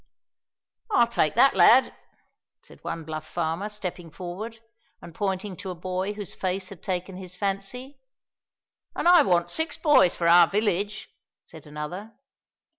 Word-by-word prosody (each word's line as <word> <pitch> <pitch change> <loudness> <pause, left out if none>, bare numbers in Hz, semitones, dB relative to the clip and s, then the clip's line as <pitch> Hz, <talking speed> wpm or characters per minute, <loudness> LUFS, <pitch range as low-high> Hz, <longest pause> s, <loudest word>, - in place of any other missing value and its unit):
"I'll 395 - +4
take 180 -9 0
that 270 +4 +5
lad," 230 +8 +6 0.7
said - - -17
one 165 0 -5
bluff 155 0 -7
farmer, 170 +4 -3
stepping 180 -5 -6
forward, 190 +8 -7 0.4
and 170 - -12
pointing 195 +1 -3
to 190 - -7
a 180 - -5
boy 185 +3 -3
whose 205 -2 -7
face 185 0 -3
had 195 -5 -12
taken 185 -1 -4
his 185 -1 -8
fancy. 210 +8 -4 0.9
"And - - -1
I 350 -2 +8
want 175 -8 +1
six 320 +1 -1
boys 295 - +4
for 170 - -1
our 170 0 +7
village," 205 +1 -1 0.4
said 160 -2 -13
another. 150 +9 -7
190 Hz, 145 wpm, -25 LUFS, 175-210 Hz, 0.9 s, I